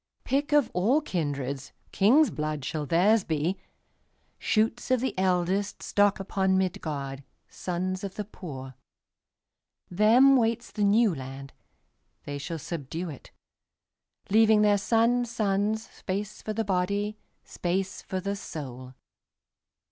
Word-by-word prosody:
Pick 285 Hz, +3 st, 0 dB
of 290 Hz, -5 st, +3 dB
all 220 Hz, +11 st, +3 dB
kindreds, 140 Hz, -, -3 dB, 0.2 s
King's 250 Hz, +7 st, +4 dB
blood 150 Hz, -2 st, -3 dB
shall 150 Hz, -1 st, -3 dB
theirs 195 Hz, +7 st, +4 dB
be, 165 Hz, +4 st, -1 dB, 0.8 s
Shoots 225 Hz, +2 st, 0 dB
of 255 Hz, -1 st, +3 dB
the 260 Hz, +2 st, -1 dB
eldestStock 190 Hz, +2 st, +1 dB
upon 190 Hz, 0 st, +1 dB
Midgard, 145 Hz, -7 st, -3 dB, 0.3 s
Sons 185 Hz, +2 st, -3 dB
of 195 Hz, -1 st, -5 dB
the 210 Hz, -, -4 dB
poor. 135 Hz, -10 st, -8 dB, 1.2 s
Them 230 Hz, +8 st, +6 dB
waits 230 Hz, 0 st, 0 dB
the 210 Hz, -, -2 dB
New 210 Hz, 0 st, +4 dB
Land; 135 Hz, -1 st, -8 dB, 0.7 s
They 145 Hz, 0 st, -5 dB
shall 165 Hz, +4 st, -4 dB
subdue 160 Hz, +2 st, -5 dB
it, 140 Hz, -, -12 dB, 1.0 s
Leaving 220 Hz, 0 st, +5 dB
their 205 Hz, -1 st, +4 dB
sons' 235 Hz, +3 st, +2 dB
sonsSpace 210 Hz, -1 st, -2 dB
for 215 Hz, -, -3 dB
the 225 Hz, 0 st, -1 dB
body, 200 Hz, +3 st, -1 dB, 0.2 s
Space 185 Hz, +2 st, -3 dB
for 190 Hz, -2 st, -4 dB
the 200 Hz, +2 st, -2 dB
soul. 130 Hz, -8 st, -8 dB
195 Hz, 115 wpm, -27 LUFS, 160-215 Hz, 1.2 s, Them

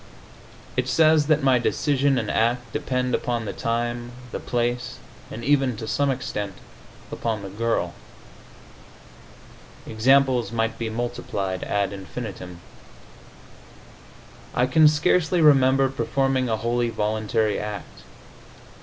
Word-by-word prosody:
It -, -, 0 dB
says 155 Hz, -2 st, +4 dB
that 155 Hz, -2 st, +2 dB
my 130 Hz, -2 st, +4 dB
decision 140 Hz, +2 st, +1 dB
and 110 Hz, -3 st, -1 dB
act 120 Hz, +1 st, 0 dB
depend 125 Hz, -1 st, -1 dB
upon 120 Hz, -2 st, -1 dB
the -, -, -4 dB
time, 120 Hz, +1 st, -2 dB, 0.2 s
the -, -, -4 dB
place 120 Hz, 0 st, -2 dB, 0.3 s
and 115 Hz, -, -7 dB
even 135 Hz, -3 st, +2 dB
to 110 Hz, 0 st, -6 dB
some 140 Hz, +4 st, +1 dB
extent, 105 Hz, -6 st, -3 dB, 0.6 s
upon 110 Hz, -3 st, -3 dB
the 95 Hz, -, -7 dB
girl. 105 Hz, -5 st, -1 dB, 1.9 s
Examples 130 Hz, +2 st, +3 dB
might 115 Hz, -1 st, -1 dB
be 115 Hz, -1 st, -2 dB
multiplied 110 Hz, -5 st, -3 dB
ad 100 Hz, -1 st, -1 dB
infinitum. 95 Hz, -3 st, -7 dB, 1.9 s
I 125 Hz, -, +3 dB
can 155 Hz, +5 st, +5 dB
scarcely 160 Hz, +3 st, +2 dB
remember 135 Hz, -3 st, +5 dB
performing 135 Hz, -1 st, 0 dB
a 110 Hz, -, 0 dB
wholly 120 Hz, +1 st, 0 dB
voluntary 110 Hz, 0 st, 0 dB
act. 105 Hz, -1 st, -7 dB
120 Hz, 115 wpm, -24 LUFS, 110-135 Hz, 1.9 s, can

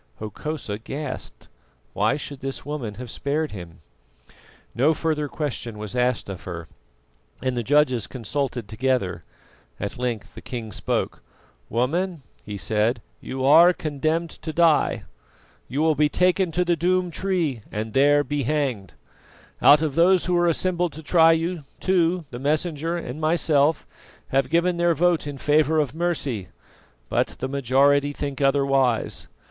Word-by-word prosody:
Hokosa 110 Hz, 0 st, -5 dB
gasped. 135 Hz, +3 st, -6 dB, 0.5 s
Why 110 Hz, +7 st, +1 dB
should 140 Hz, -2 st, -7 dB
this 135 Hz, 0 st, -5 dB
woman 135 Hz, -8 st, -4 dB
have 120 Hz, 0 st, -7 dB
spared 150 Hz, +2 st, -2 dB
him? 85 Hz, -5 st, -9 dB, 0.9 s
No 145 Hz, +7 st, +3 dB
further 155 Hz, -2 st, -1 dB
question 135 Hz, -7 st, -4 dB
was 105 Hz, +2 st, -6 dB
asked 125 Hz, -1 st, +1 dB
of 95 Hz, -3 st, -6 dB
her, 85 Hz, -3 st, -6 dB, 0.8 s
and 130 Hz, -1 st, 0 dB
the 120 Hz, -, 0 dB
judges 130 Hz, -2 st, +2 dB
consulted 125 Hz, -1 st, -3 dB
together. 110 Hz, -7 st, -1 dB, 0.6 s
At 100 Hz, +4 st, -5 dB
length 120 Hz, -4 st, -3 dB
the -, -, -10 dB
king 115 Hz, -4 st, -6 dB
spoke. -, -, -2 dB, 0.5 s
"Woman," 160 Hz, -, -1 dB, 0.2 s
he 105 Hz, -1 st, -6 dB
said, 110 Hz, +6 st, +1 dB, 0.2 s
"you 130 Hz, 0 st, -3 dB
are 170 Hz, +6 st, +7 dB
condemned 155 Hz, +2 st, -1 dB
to 160 Hz, -, -7 dB
die. 165 Hz, -1 st, +3 dB, 0.6 s
You 145 Hz, +4 st, -1 dB
will 160 Hz, -1 st, +4 dB
be 150 Hz, 0 st, +2 dB
taken 180 Hz, +1 st, +2 dB
to 180 Hz, +2 st, +1 dB
the 175 Hz, 0 st, +2 dB
Doom 180 Hz, +2 st, +1 dB
Tree, 170 Hz, -, -1 dB
and 110 Hz, +1 st, -4 dB
there 145 Hz, +2 st, +4 dB
be 145 Hz, 0 st, -2 dB
hanged. 130 Hz, -, -1 dB, 0.7 s
Out 150 Hz, +2 st, +7 dB
of 155 Hz, -3 st, -1 dB
those 175 Hz, +4 st, +4 dB
who 180 Hz, -, +1 dB
are 175 Hz, 0 st, +3 dB
assembled 175 Hz, 0 st, 0 dB
to 160 Hz, +3 st, -9 dB
try 165 Hz, +1 st, +5 dB
you, 165 Hz, 0 st, -1 dB, 0.2 s
two, 180 Hz, -2 st, +1 dB
the 120 Hz, -, -6 dB
Messenger 155 Hz, +3 st, -1 dB
and 150 Hz, -2 st, -6 dB
myself, 155 Hz, -1 st, +2 dB, 0.4 s
have 135 Hz, +1 st, +1 dB
given 170 Hz, +2 st, +2 dB
their 170 Hz, -1 st, +2 dB
vote 175 Hz, -2 st, +2 dB
in 145 Hz, -1 st, -5 dB
favour 150 Hz, +2 st, +2 dB
of 145 Hz, -5 st, +1 dB
mercy, 145 Hz, -, -2 dB, 0.6 s
but -, -, 0 dB
the 130 Hz, -, -3 dB
majority 140 Hz, +2 st, +2 dB
think 140 Hz, -1 st, -4 dB
otherwise. 135 Hz, -4 st, +1 dB
145 Hz, 150 wpm, -24 LUFS, 125-165 Hz, 0.9 s, are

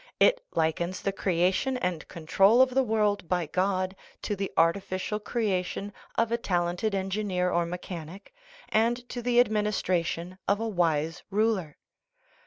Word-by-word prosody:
It -, -, +5 dB
likens 170 Hz, +3 st, 0 dB
the 195 Hz, -, +1 dB
creation 190 Hz, +7 st, +1 dB
and 180 Hz, -9 st, -2 dB
control 195 Hz, +7 st, +3 dB
of 260 Hz, 0 st, +6 dB
the 265 Hz, +1 st, +3 dB
world 210 Hz, -6 st, 0 dB
by 180 Hz, -2 st, +1 dB
God 185 Hz, +3 st, 0 dB, 0.3 s
to 210 Hz, -, -1 dB
the 195 Hz, 0 st, -3 dB
artificial 185 Hz, +4 st, +1 dB
creation 205 Hz, -3 st, -2 dB, 0.2 s
of 230 Hz, 0 st, +1 dB
a 235 Hz, -, +2 dB
tal 175 Hz, -6 st, +1 dB
ented 195 Hz, +4 st, -1 dB
engineer 190 Hz, -2 st, -1 dB
or 170 Hz, 0 st, +1 dB
mechanic, 180 Hz, -, -7 dB, 0.4 s
and 240 Hz, +3 st, +1 dB
to 245 Hz, -, -4 dB
the 240 Hz, 0 st, +3 dB
administration 185 Hz, -5 st, 0 dB
of 200 Hz, +1 st, +2 dB
a 225 Hz, -, -1 dB
wise 165 Hz, -5 st, 0 dB
ruler. 205 Hz, -7 st, 0 dB
195 Hz, 145 wpm, -28 LUFS, 175-215 Hz, 0.4 s, of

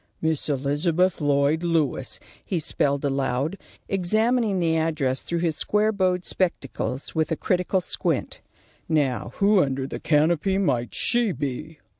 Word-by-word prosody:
"Miss 160 Hz, -2 st, -1 dB
Elizabeth 155 Hz, +6 st, +1 dB
Lloyd 145 Hz, +2 st, +2 dB
Lewis," 160 Hz, -7 st, 0 dB, 0.2 s
he 180 Hz, -, -2 dB
spelled 140 Hz, -2 st, 0 dB
aloud, 135 Hz, +3 st, 0 dB, 0.3 s
examining 215 Hz, +3 st, +1 dB
the 165 Hz, -2 st, +1 dB
address 155 Hz, -5 st, 0 dB
through 170 Hz, -1 st, -3 dB
his 165 Hz, -3 st, 0 dB
square 210 Hz, +1 st, +2 dB
bowed 185 Hz, -3 st, 0 dB
spectacles 140 Hz, -6 st, -2 dB
with 160 Hz, 0 st, 0 dB
a -, -, +2 dB
critical 185 Hz, +1 st, 0 dB
squint. -, -, -2 dB, 0.5 s
"Now, 130 Hz, -8 st, 0 dB
who 200 Hz, -1 st, +4 dB
under 135 Hz, -2 st, -1 dB
the -, -, -6 dB
canopy 165 Hz, +5 st, +2 dB
might 130 Hz, -11 st, 0 dB
she 235 Hz, -3 st, +2 dB
be?" 145 Hz, +2 st, -5 dB
160 Hz, 135 wpm, -24 LUFS, 140-185 Hz, 0.5 s, who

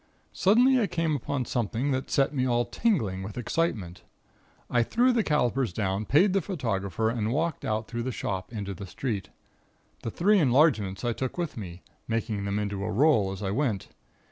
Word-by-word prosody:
"Suddenly 245 Hz, +6 st, +4 dB
I 210 Hz, -, +2 dB
came 165 Hz, -3 st, 0 dB
upon 135 Hz, -1 st, -2 dB
something 120 Hz, +3 st, -1 dB
that 130 Hz, 0 st, -2 dB
set 135 Hz, +1 st, +2 dB
me 130 Hz, -3 st, 0 dB
all 120 Hz, -1 st, +2 dB
tingling 115 Hz, -, 0 dB
with 100 Hz, +3 st, -7 dB
excitement. 110 Hz, -, -2 dB, 0.7 s
I 120 Hz, -, +2 dB
threw 245 Hz, -, +3 dB
the 235 Hz, -, +3 dB
calipers 135 Hz, -, +1 dB
down, 100 Hz, +2 st, -1 dB
paid 180 Hz, -, +4 dB
the 195 Hz, -, +2 dB
photographer, 110 Hz, -, -1 dB
and 115 Hz, -2 st, -1 dB
walked 160 Hz, +5 st, -1 dB
out 110 Hz, +1 st, -1 dB
through 120 Hz, 0 st, -4 dB
the 130 Hz, +2 st, -2 dB
shop 95 Hz, -4 st, -4 dB
into 100 Hz, -4 st, -4 dB
the 95 Hz, +2 st, -8 dB
street. 105 Hz, -1 st, -3 dB, 0.7 s
The -, -, -3 dB
three 200 Hz, -, +3 dB
enlargements 125 Hz, -, +3 dB
I 120 Hz, -, +1 dB
took 130 Hz, +6 st, -4 dB
with 175 Hz, -3 st, -3 dB
me, 90 Hz, -5 st, -8 dB, 0.2 s
making 115 Hz, -3 st, -2 dB
them 100 Hz, +1 st, -1 dB
into 100 Hz, -1 st, -2 dB
a 105 Hz, -, -2 dB
roll 110 Hz, -4 st, +3 dB
as 95 Hz, +1 st, -6 dB
I 95 Hz, -, -1 dB
went. 110 Hz, -5 st, -1 dB
120 Hz, 185 wpm, -27 LUFS, 100-150 Hz, 0.7 s, Suddenly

